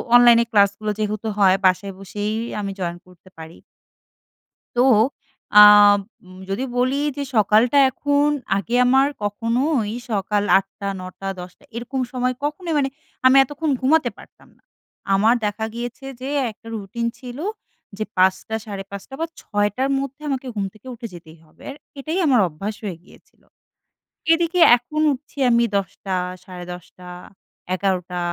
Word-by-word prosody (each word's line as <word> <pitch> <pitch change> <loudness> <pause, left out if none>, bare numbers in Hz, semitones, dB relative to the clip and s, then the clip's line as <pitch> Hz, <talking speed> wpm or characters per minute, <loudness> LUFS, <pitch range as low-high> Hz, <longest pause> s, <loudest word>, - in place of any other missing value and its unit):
অনলাইনে 240 -1 +7
ক্লাসগুলো 205 0 +2
যেহেতু 215 +1 -2
হয় 190 -2 +5
বাসায় 190 +1 +2
বসেই 205 +2 -4 0.3
আমি 200 -1 -3
জয়েন 175 -1 -3
করতে 180 0 -20
পারি। 160 +1 -11 1.2
তো - - +3 0.8
আব 205 0 +8 0.3
উম 185 0 -14
যদি 200 +7 -2
বলি 255 +2 +1 0.2
যে 285 - -3
সকালটা 220 +6 +4
এখন 285 +3 +1 0.3
আগে 200 +4 -3
আমার 265 +2 +4 0.2
কখনোই 230 +3 0 0.2
সকাল 205 0 0 0.2
৮ঃ০০, 195 +1 -7
৯ঃ০০, 185 +1 -9
১০ঃ০০ 180 +8 -12
এরকম 245 +3 -4
সময় 255 0 -1
কখনো 305 +4 -4
মানে 275 -2 +1 0.4
আমি 260 +1 +6
এতক্ষণ 290 +3 -3
ঘুমাতে 265 -1 +3
পারতাম - - -17
না। - - -34 0.5
আমার 220 +5 +4
দেখা 210 +1 -2
গিয়েছে 245 +3 -6
যে, 260 - -5 0.2
একটা 225 +1 -18
রুটিন 220 +3 -4
ছিল 250 0 -9 0.6
যে 215 - -1
৫ঃ০০, 190 +4 +2
৫ঃ৩০ 200 +3 -8
বা 330 - 0
৬ঃ০০ 205 +3 -1
র - - -1
মধ্যে 275 +2 -7
আমাকে 270 -2 -3
ঘুম 205 -2 -2
থেকে 215 +4 -20
উঠে 235 0 -7
যেতেই 165 -1 -13
হবে, 155 - -22
আর 275 - -9 0.2
এটাই 315 +6 -3
আমার 255 -6 +4
অভ্যাস 195 +7 -6
হয়ে 185 -4 -4
গিয়েছিলো। - - -22 0.9
এদিকে 340 +2 0 0.2
এখন 300 +6 -4
উঠছি 280 +2 -12
আমি 235 0 +4
১০ঃ০০ 195 0 -5 0.3
১০ঃ৩০ 180 0 -10 0.7
১১ঃ০০ 180 -2 -2
215 Hz, 140 wpm, -21 LUFS, 195-260 Hz, 1.2 s, আব